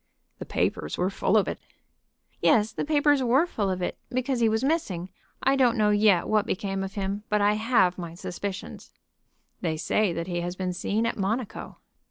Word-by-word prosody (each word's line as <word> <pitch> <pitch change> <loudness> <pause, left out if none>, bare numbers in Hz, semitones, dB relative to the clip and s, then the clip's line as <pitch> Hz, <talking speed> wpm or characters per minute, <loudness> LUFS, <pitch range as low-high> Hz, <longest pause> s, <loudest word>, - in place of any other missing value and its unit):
"The - - -7
papers 75 - -1
were 180 +2 0
full 200 +2 +2
of 205 - +2
it." - - -4 0.8
"Yes, 215 -1 +4
the - - -3
papers 290 -2 +3
were 260 +6 +3
full 210 - -2
of 185 -1 -2
it, - - -3
because 255 0 -1
he 230 -1 +4
was 220 +3 0
missing. 195 - -1 0.3
I 270 +1 +4
don't 250 -4 +3
know 210 -1 +3
yet 205 -4 +4
what 215 0 +2
became 195 -2 -2
of 195 0 -6
him, 200 0 -2
but 210 - +2
I 205 +1 +3
have 210 -5 +2
my 170 -1 -6
suspicions." 190 +3 -6 0.7
"They 160 -3 -1
say 210 +4 +1
that 170 0 -3
he 175 -1 -2
has 175 +1 -4
been 185 -1 -2
seen 210 +5 -1
at 230 - -1
Monaco." 215 +4 -3
205 Hz, 195 wpm, -26 LUFS, 185-235 Hz, 0.8 s, Yes